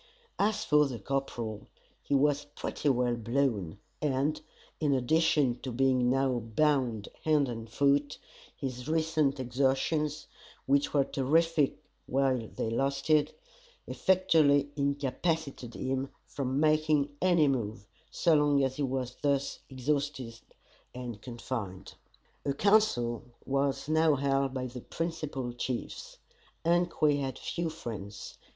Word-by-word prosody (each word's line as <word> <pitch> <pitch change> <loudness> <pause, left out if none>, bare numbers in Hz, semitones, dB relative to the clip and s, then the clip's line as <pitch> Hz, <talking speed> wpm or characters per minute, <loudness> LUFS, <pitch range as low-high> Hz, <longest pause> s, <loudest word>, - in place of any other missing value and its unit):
As 215 +1 +1
for 150 -1 +4
the 125 -3 -5
corporal, 115 -3 -3 0.3
he 140 - 0
was 145 +1 +2
pretty 145 - -2
well 125 -2 +2
blown, 115 - -1 0.2
and, 145 +1 0 0.4
in 145 -3 +2
addition 140 -1 +2
to 130 - -5
being 130 0 +2
now 130 -1 +2
bound 120 -2 +1 0.2
hand 150 -3 +3
and 115 -2 -6
foot, 140 +3 +2 0.4
his 125 -2 -5
recent 155 -3 +1
exertions, 135 +4 0 0.4
which 140 +1 +2
were 140 -2 +3
terrific 150 +2 +2 0.3
while 130 -3 +1
they 110 - -3
lasted, 140 +4 +1 0.5
effectually 155 -7 +3
incapacitated 140 -2 -2
him 135 +1 -1 0.2
from 135 -1 -2
making 155 -2 +2
any 175 -4 +4
move, 110 -6 -2 0.2
so 170 - +2
long 145 -2 +4
as 130 0 -1
he - - -2
was 130 -2 -2
thus 140 -1 0
exhausted 135 -3 -2 0.6
and 120 -4 -6
confined. 115 -6 -6 0.5
A 140 - -1
council 140 - +2 0.2
was 140 +1 0
now 160 -1 +4
held 135 0 +1
by 130 -1 -3
the 125 0 -7
principal 150 -7 -4
chiefs. 120 0 -5 0.5
Ungque 170 -4 +2
had 135 -1 -3
few 170 -1 -3
friends. 110 -10 -7
140 Hz, 120 wpm, -30 LUFS, 125-150 Hz, 0.6 s, for